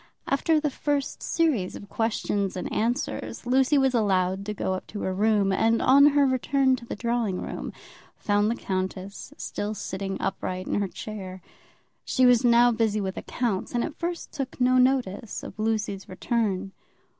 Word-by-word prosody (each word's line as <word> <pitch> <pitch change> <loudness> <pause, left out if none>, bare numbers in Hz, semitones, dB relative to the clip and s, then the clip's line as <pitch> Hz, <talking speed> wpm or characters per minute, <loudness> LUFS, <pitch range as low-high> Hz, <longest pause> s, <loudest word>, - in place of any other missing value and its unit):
After 310 +3 +2
the 300 -1 -1
first 290 0 -2
series 280 - 0
of 200 - -9
questions 205 -3 -1
and - - -4
answers, 240 +4 -2
Lucy 265 +3 +3
was 265 -1 +3
allowed 195 -3 +1
to 210 - -2
go 190 - -1
up 185 - -5
to 205 - -6
her 190 - -1
room, 205 0 +2
and 225 +4 +2
on 280 +2 +6
her 285 -1 +4
return 260 0 +2
to 235 - -11
the - - -4
drawing 230 -4 -1
room, - - -5 0.5
found 205 0 +1
the 235 - 0
countess 190 -1 -4
still 210 +1 -4
sitting 195 0 -4
upright 185 -1 -3
in - - 0
her 200 - 0
chair. 190 -2 -7 0.6
She 255 - +2
was 245 -1 +5
now 240 0 +6
busy 220 -2 +1
with 190 -2 -3
accounts, 235 -3 -2
and 240 - +1
at 315 - -6
first 345 0 -4
took 270 -2 -5
no 255 0 +4
notice 250 -5 0
of - - -9
Lucy's 215 -3 -1
return. 195 0 -1
220 Hz, 170 wpm, -26 LUFS, 195-255 Hz, 0.6 s, on